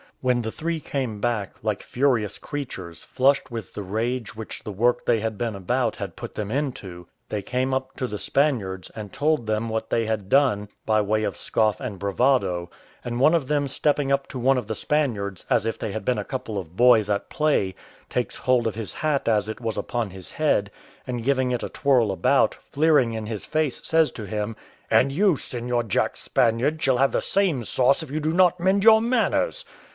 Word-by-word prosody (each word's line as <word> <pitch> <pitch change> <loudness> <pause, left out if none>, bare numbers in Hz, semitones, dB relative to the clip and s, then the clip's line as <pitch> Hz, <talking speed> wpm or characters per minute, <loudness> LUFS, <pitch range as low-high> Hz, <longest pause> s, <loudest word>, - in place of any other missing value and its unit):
When 125 -2 +1
the 110 - -3
three 165 +4 -3
came 130 -8 -3
back 110 -4 -1
like 105 -2 -1
furious 125 -6 0
creatures, 95 - -6
flushed 135 +2 +2
with 115 -5 -7
the - - -4
rage 115 +4 -2
which 110 0 -7
the 105 - -5
work 120 +5 +1
they 115 -2 +3
had 110 0 -2
been 115 -3 -2
about 120 +6 0
had 100 -5 -6
put 120 -1 -8
them 105 -1 -4
into, 110 - -4 0.2
they 105 - -2
came 130 +5 -1
up 130 0 -3
to 130 - -1
the 105 -3 -5
Spaniards, 110 -11 0
and 105 -3 -7
told 150 -4 +1
them 110 +1 -1
what 110 0 -3
they 115 - +1
had 110 -3 -2
done, 115 -7 +3 0.2
by 110 -1 +3
way 110 +1 0
of - - -2
scoff 110 -2 +1
and 120 -7 -5
bravado; 100 -4 +1 0.3
and 120 0 -3
one 150 +5 +5
of 150 -6 0
them 145 -1 +1
stepping 145 0 0
up 140 0 +1
to - - -7
one 135 +2 +3
of 115 - -8
the 110 - -2
Spaniards, 105 - -1
as - - +2
if 115 - -2
they - - -3
had 105 -1 -5
been 125 - +1
a - - -4
couple 120 -5 -4
of 90 -3 -6
boys 115 -2 +5
at 100 -1 -1
play, 145 -12 +1 0.3
takes - - -2
hold 125 -2 +2
of 110 - -3
his 110 -2 -5
hat 150 -5 0
as 110 -1 +2
it 110 +2 -6
was 115 -2 -3
upon 115 +1 -2
his 95 -1 -9
head, 125 -10 +1 0.4
and 125 -3 -4
giving 130 0 +1
it 125 - -1
a - - -3
twirl 125 -7 +2
about, 95 - +2 0.2
fleering 145 -5 +3
in 110 -1 -4
his 110 -2 -5
face, 155 -3 0
says 160 -1 +3
to 110 - -7
him, 105 +1 -3 0.3
"And 135 - +4
you, 190 +4 +3
Seignior 120 -2 -2
Jack 110 - 0
Spaniard, 125 +7 +1
shall 130 -2 +3
have 135 +2 +3
the - - 0
same 180 -11 +1
sauce 130 +6 +3
if 155 - -10
you 155 - -1
do 155 +1 -1
not 180 0 +4
mend 190 +3 +2
your 220 0 +7
manners." 255 - +1
120 Hz, 210 wpm, -24 LUFS, 105-140 Hz, 0.4 s, your